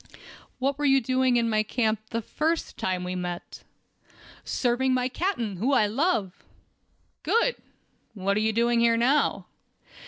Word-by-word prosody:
"What 275 +2 -1
were 295 - 0
you 270 -1 +5
doing 255 0 +1
in 230 -1 +1
my 215 -1 +2
camp 220 0 0
the 230 -1 -3
first 320 +8 -2
time 185 -1 -2
we 180 0 -4
met?" 180 -1 -6 0.8
"Serving 255 +1 0
my 250 0 +1
captain, 250 - -2
whom 260 +9 +1
I 215 - +4
love." 215 - -1 0.8
"Good! 470 +2 +1 0.6
What 200 0 0
are - - +1
you 220 +1 +1
doing 235 +1 +2
here 230 0 +3
now?" 260 +6 +2
235 Hz, 150 wpm, -26 LUFS, 215-265 Hz, 0.8 s, you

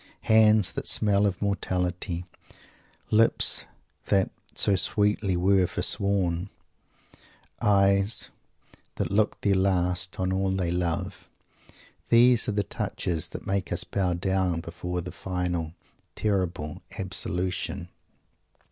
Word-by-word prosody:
Hands 110 -3 +4
that - - -4
"smell 105 -1 +3
of 100 0 -3
mortality," 90 -3 -2 0.9
lips 115 +1 +3 0.4
that 95 -1 +2 0.2
"so 100 - +3
sweetly 105 -1 +2
were 95 0 +3
forsworn," 95 -2 0 1.1
eyes 100 +1 +3 0.6
that - - -3
"look 105 +1 +1
their 100 - +2
last" 90 -1 0
on 95 0 0
all 95 0 0
they 90 -3 -1
love, 90 +2 -3 0.8
these 120 0 +5
are - - 0
the 105 0 0
touches 85 -2 -3
that - - -9
make 95 -1 -2
us - - +2
bow 90 -3 -1
down 95 -1 0
before 90 +1 -5
the 90 - -7
final 90 -3 -3 0.4
terrible 90 -7 -2 0.2
absolution. 90 0 -3
95 Hz, 110 wpm, -26 LUFS, 90-100 Hz, 1.1 s, these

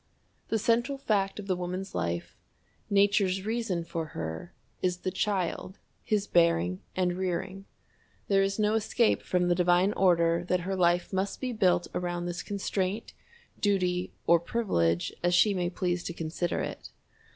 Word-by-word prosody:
The 225 - +1
central 235 +5 +1
fact 205 -7 0
of 210 - -6
the 190 -2 0
woman's 180 +2 -4
life 85 -1 -3 0.5
Nature's 200 -1 +3
reason 220 -6 -1
for 165 -1 -4
her 80 0 -5 0.3
is 180 -1 0
the 185 - -2
child, 190 -1 -2 0.3
his 210 -2 0
bearing 90 - +2
and 180 -1 +1
rearing. 185 +1 -3 0.6
There 195 -1 +4
is 195 0 0
no 210 0 +2
escape 225 +1 +2
from 180 -1 0
the 175 - +4
divine 180 +3 +3
order 170 -3 +3
that 180 -1 +1
her 190 +2 -2
life 175 0 +2
must 190 +1 -1
be 255 -2 -3
built 185 -5 +3
around 175 -1 -2
this 175 0 -3
constraint, 200 +1 -2 0.5
duty, 185 -3 +1
or 170 0 +5
privilege, 85 - 0
as 175 0 +2
she 205 +3 +5
may 180 -2 -1
please 180 -1 -1
to 170 - -3
consider 165 +1 -2
it. - - -6
185 Hz, 155 wpm, -29 LUFS, 175-200 Hz, 0.6 s, or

